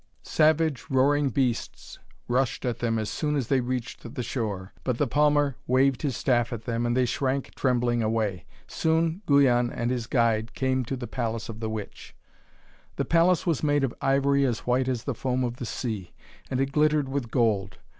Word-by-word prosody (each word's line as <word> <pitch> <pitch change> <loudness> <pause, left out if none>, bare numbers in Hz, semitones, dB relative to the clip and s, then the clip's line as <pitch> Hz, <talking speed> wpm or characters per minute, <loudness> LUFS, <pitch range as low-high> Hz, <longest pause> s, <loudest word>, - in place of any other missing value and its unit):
Savage, 155 -4 +2
roaring 140 +1 +3
beasts 125 -1 -2 0.3
rushed 125 0 0
at 120 -2 -2
them 115 -1 0
as 110 -1 -2
soon 150 +4 -1
as 135 -6 -2
they 135 -2 +3
reached 125 0 -5
the 125 - -2
shore. 105 -7 -4
But 125 -3 -1
the 145 - +2
palmer 145 0 +2
waved 130 +1 +3
his 135 -6 -1
staff 120 -2 +1
at 115 -2 -5
them, 120 0 -1
and 120 +1 0
they 130 - +3
shrank 130 +2 -1
trembling 120 -2 +1
away. 110 -4 -1 0.2
Soon 160 +3 0
Guyon 125 -4 +4
and 120 +1 -2
his 120 -3 -2
guide 115 -3 +1
came 130 -1 0
to 135 - -3
the 125 - -5
palace 115 -2 -3
of 110 -1 -7
the 110 -1 -3
witch. 110 -2 -7 0.8
The - - -1
palace 170 +1 +3
was 165 -5 0
made 145 -2 +2
of 130 - 0
ivory 140 +1 +2
as 125 -4 0
white 125 +1 +1
as 125 -3 -1
the 140 - -2
foam 130 +2 -1
of 120 0 -3
the 125 - -5
sea, 110 -9 -4 0.4
and 130 - -1
it 135 0 0
glittered 150 -1 +2
with 135 -3 -3
gold. 105 -6 0
125 Hz, 190 wpm, -26 LUFS, 115-140 Hz, 0.8 s, Guyon